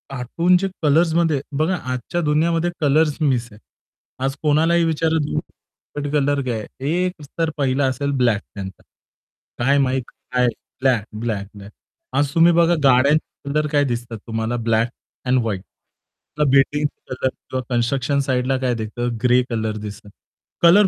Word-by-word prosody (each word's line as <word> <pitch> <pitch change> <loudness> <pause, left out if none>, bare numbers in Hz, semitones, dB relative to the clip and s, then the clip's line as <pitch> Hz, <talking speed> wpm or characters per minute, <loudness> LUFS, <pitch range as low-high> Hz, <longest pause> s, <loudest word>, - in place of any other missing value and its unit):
कार्टूनचे 175 +9 +2 0.2
कलर्समध्ये 160 -1 +3 0.2
बघा 165 +4 +1 0.2
आजच्या 130 +8 -2
दुनियामध्ये 165 +3 +2
colours 150 +1 +3
miss 125 -5 +1
आहे. 105 - -15 0.7
आज 135 +1 -1
कोणालाही 165 +3 +3
विचार 160 0 +1
तुमचा 150 -1 -2 0.4
फेवरेट 145 0 -3
कलर 145 -1 +2
काय 115 -3 -1
आहे 140 +8 -4
एक 180 - -1
उत्तर 160 +3 -2
पहिला 135 0 +1
असेल 140 +2 -1
ब्लॅक 115 -4 +2
त्यांचा. 95 -2 -7 0.8
काय 140 +2 +4
माहीत 130 -1 +2 0.3
काय 125 -1 +3 0.3
ब्लॅक, 125 -5 +3 0.2
ब्लॅक, 105 -4 -2
ब्लॅक. 100 +1 -11 0.5
आज 145 -1 +1
तुम्ही 170 +1 +6
बघा 170 0 +4
गाड्यांचे 140 +2 +2
कलर 150 +1 +1
काय 145 -1 +3
दिसतात 120 -3 -3
तुम्हाला 115 +1 -2
ब्लॅक 115 0 +1 0.4
एंड 130 0 +3
व्हाईट. 100 -4 -3 0.9
बिल्डिंगचा 140 0 +1
कलर 130 - 0
किंवा 130 0 -6
कन्स्ट्रक्शन 130 +3 +1
साइडला 130 +1 +1
काय 125 -2 0
दिसतं 115 +2 -3
ग्रे 125 0 +5
कलर 110 -2 -2
दिसतात. 105 0 -8 0.5
कलर 185 +5 +7
135 Hz, 145 wpm, -21 LUFS, 120-150 Hz, 0.9 s, कलर